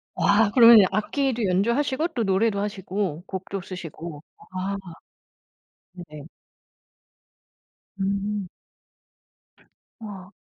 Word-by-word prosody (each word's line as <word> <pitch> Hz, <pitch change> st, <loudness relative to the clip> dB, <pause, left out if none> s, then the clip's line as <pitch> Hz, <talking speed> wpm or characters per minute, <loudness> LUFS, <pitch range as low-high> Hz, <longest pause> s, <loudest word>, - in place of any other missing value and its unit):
와 205 Hz, +1 st, +3 dB
그러면 230 Hz, -4 st, +8 dB
악기도 240 Hz, +4 st, -1 dB
연주하시고 240 Hz, -, +1 dB
또 245 Hz, -9 st, -2 dB
노래도 200 Hz, +1 st, +1 dB
하시고 195 Hz, -4 st, -3 dB
곡도 190 Hz, +1 st, -5 dB
쓰시고. 170 Hz, -4 st, -8 dB, 0.3 s
아. 190 Hz, +2 st, -2 dB, 1.2 s
네네. 150 Hz, -5 st, -11 dB, 1.7 s
음. 200 Hz, 0 st, -2 dB, 1.5 s
와. 200 Hz, -3 st, -9 dB
200 Hz, 165 characters per minute, -24 LUFS, 185-225 Hz, 1.7 s, 그러면